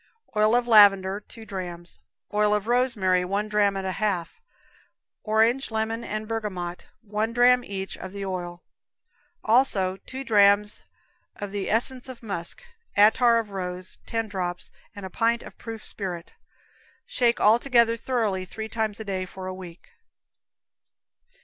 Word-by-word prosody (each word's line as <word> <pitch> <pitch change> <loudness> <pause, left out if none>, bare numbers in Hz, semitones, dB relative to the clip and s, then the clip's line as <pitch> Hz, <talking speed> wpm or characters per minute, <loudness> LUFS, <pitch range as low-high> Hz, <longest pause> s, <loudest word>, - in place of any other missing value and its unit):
Oil 215 +2 +4
of 245 0 +1
lavender, 200 -3 +6
two 220 +2 -13
drams; 175 -3 -7 0.3
oil 210 0 +3
of 210 -1 -2
rosemary, 230 -7 +2
one 200 +3 -1
dram 205 -2 +2
and 190 - -4
a 190 - -1
half; 200 - -2 0.8
orange, 225 +5 +2
lemon 225 +1 -2
and 215 0 -4
bergamot, 190 -6 -4
one 215 +2 -2
dram 245 +1 +5
each 195 -3 -5
of 190 - -7
the 200 0 -5
oil; 175 -2 -5 0.8
also 210 -6 +2
two 260 +7 -8
drams 205 -2 +4 0.5
of 205 -1 -6
the 200 -1 -3
essence 250 +3 -1
of 245 -2 -10
musk, 185 - -4 0.3
attar 230 +3 +6
of 220 -3 -2
rose, 185 -1 -5
ten 225 -1 -2
drops, 180 -3 -4 0.2
and 200 -1 -7
a 190 - -8
pint 230 +3 +1
of - - -12
proof 225 -1 -7
spirit. 180 -4 -5 0.7
Shake 235 -2 +1
all 220 +3 +5
together 235 -3 +3
thoroughly 225 -6 -1
three 220 +4 -7
times 220 -2 -2
a - - -5
day 190 -2 -3
for 190 +1 -9
a 185 - -4
week. 185 - -11
210 Hz, 150 wpm, -25 LUFS, 190-230 Hz, 0.8 s, lavender